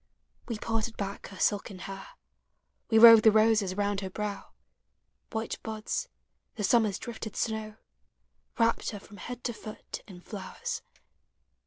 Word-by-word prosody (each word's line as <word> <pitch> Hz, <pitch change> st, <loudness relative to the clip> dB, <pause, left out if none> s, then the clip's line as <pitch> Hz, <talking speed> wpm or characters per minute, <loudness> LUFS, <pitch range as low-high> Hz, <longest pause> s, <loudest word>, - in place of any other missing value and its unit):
We 230 Hz, -, -3 dB
parted 225 Hz, +1 st, -2 dB
back 200 Hz, -1 st, -4 dB
her 195 Hz, -, -11 dB
silken 200 Hz, -1 st, 0 dB
hair, 195 Hz, +1 st, -7 dB, 0.8 s
We 225 Hz, -, +4 dB
wove 230 Hz, -1 st, +11 dB
the 220 Hz, -, +7 dB
roses 215 Hz, -3 st, +3 dB
round 205 Hz, -1 st, 0 dB
her 190 Hz, -, -4 dB
brow 205 Hz, 0 st, -4 dB, 0.4 s
— -, -, -49 dB
White 220 Hz, 0 st, -3 dB
buds, 220 Hz, -, -3 dB, 0.5 s
the 210 Hz, -, -4 dB
summer's 215 Hz, -1 st, +3 dB
drifted 225 Hz, -3 st, -6 dB
suow 220 Hz, -1 st, -2 dB, 0.4 s
— -, -, -41 dB
Wrapt 230 Hz, -1 st, +2 dB
her 205 Hz, -, -6 dB
from 205 Hz, +1 st, -14 dB
head 245 Hz, +2 st, -7 dB
to 240 Hz, -, -1 dB
foot 215 Hz, -1 st, -8 dB
in 185 Hz, -4 st, -11 dB
flowers 195 Hz, +1 st, -5 dB
215 Hz, 150 wpm, -29 LUFS, 200-225 Hz, 0.8 s, wove